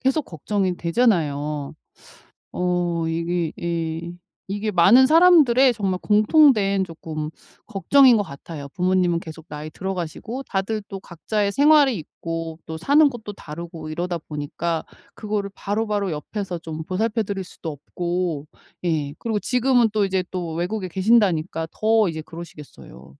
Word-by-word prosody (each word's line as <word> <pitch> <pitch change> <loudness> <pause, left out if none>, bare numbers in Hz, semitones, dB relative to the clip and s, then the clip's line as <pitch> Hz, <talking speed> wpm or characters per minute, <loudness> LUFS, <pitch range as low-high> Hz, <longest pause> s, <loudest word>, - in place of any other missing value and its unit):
계속 270 +4 +1
걱정이 185 +3 -2
되잖아요. 150 - 0 0.8
어 175 -2 0
이게 165 0 -1
이 170 0 -3 0.4
이게 205 +2 -2
많은 205 +9 +6
사람들의 295 -6 +6
정말 195 -4 -1
공통된 210 -3 +4
쪼끔 155 -3 -6 0.4
걱정인 245 +5 +5
것 205 - +1
같아요. 140 -1 -9
부모님은 180 +1 +1
계속 160 -1 -10
나이 150 +1 -6
들어가시고 190 - -5
다들 210 +1 -2
또 195 -1 -7
각자의 200 +4 -2
생활이 285 -1 +5
있고 165 0 -6
또 160 0 -6
사는 285 - +4
곳도 220 -5 -8
다르고 165 -1 -8
이러다 175 +2 -3
보니까 155 +2 -4 0.3
그거를 210 -2 -3
바로바로 205 -2 -2
옆에서 175 +4 -5
좀 160 -1 -6
보살펴 220 +5 0
드릴 195 -1 -4
수도 165 -2 -7
없고. 170 +1 -3 0.4
예. 150 -4 -1
그리고 225 -2 -2
지금은 250 -1 +2
또 210 -2 +2
이제 190 -1 0
또 175 -3 -4
외국에 185 +4 -2
계신다니까 185 -5 +2
더 220 -1 +3
이제 160 -2 -4
그러시겠어요. 150 - -12
185 Hz, 315 characters per minute, -22 LUFS, 165-215 Hz, 0.8 s, 많은